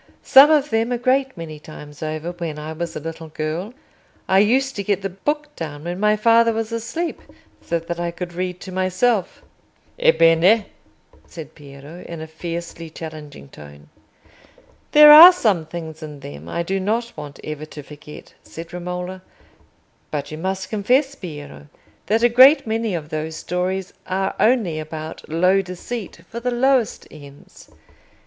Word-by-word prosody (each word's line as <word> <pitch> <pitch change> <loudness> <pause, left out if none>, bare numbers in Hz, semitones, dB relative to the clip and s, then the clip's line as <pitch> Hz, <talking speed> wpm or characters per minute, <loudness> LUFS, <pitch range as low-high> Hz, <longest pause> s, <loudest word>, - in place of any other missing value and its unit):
"Some 275 +3 +8
of 300 -3 +2
them 225 +2 0
a 245 - 0
great 265 0 0
many 155 -2 -8
times 150 -1 -12
over, 155 +2 -4
when 170 -3 -6
I 155 +1 -6
was 170 +1 -5
a - - -3
little 165 +1 -7
girl. 155 +6 -4 0.6
I 190 - +4
used 260 +6 +2
to 200 - -2
get 200 -1 -1
the 195 - -3
book 295 +10 -3
down 150 -3 -7
when 175 +2 -5
my 210 +1 +3
father 230 +1 +4
was 225 0 -3
asleep, 230 +10 -4 0.4
so 170 - -2
that 170 +1 -6
I 175 0 -1
could 175 +1 -7
read 180 0 -4
to 190 - -8
myself." 185 +3 0 0.6
"Ebbene?" 200 - +4 0.6
said 160 -3 -10
Piero, 145 +4 -12
in 170 -1 -7
a 160 - -6
fiercely 170 +1 -7
challenging 155 - -10
tone. 75 0 -14 1.0
"There 300 0 +9
are 325 +4 +12
some 205 - 0
things 160 -1 -8
in 150 -2 -9
them 75 - -10
I 170 - -2
do 195 +3 -2
not 225 +5 -2
want 145 -1 -9
ever 155 0 -6
to 150 -1 -10
forget," 150 +1 -13
said 165 +1 -11
Romola; 180 +1 -5 0.9
"but 145 -1 -4
you 155 - -6
must 190 +1 -4
confess, 255 +7 +1
Piero, 150 - -10 0.4
that 220 +3 +1
a - - +7
great 260 +6 +7
many 220 -3 -1
of 150 -3 -6
those 155 0 -4
stories 180 +2 -3
are 190 +1 -1
only 215 -9 +2
about 155 0 -8
low 180 +5 +3
deceit 185 +1 -7
for 235 - -7
the 250 +1 -2
lowest 250 -1 +1
ends. 145 -2 -15
180 Hz, 165 wpm, -21 LUFS, 155-225 Hz, 1.0 s, are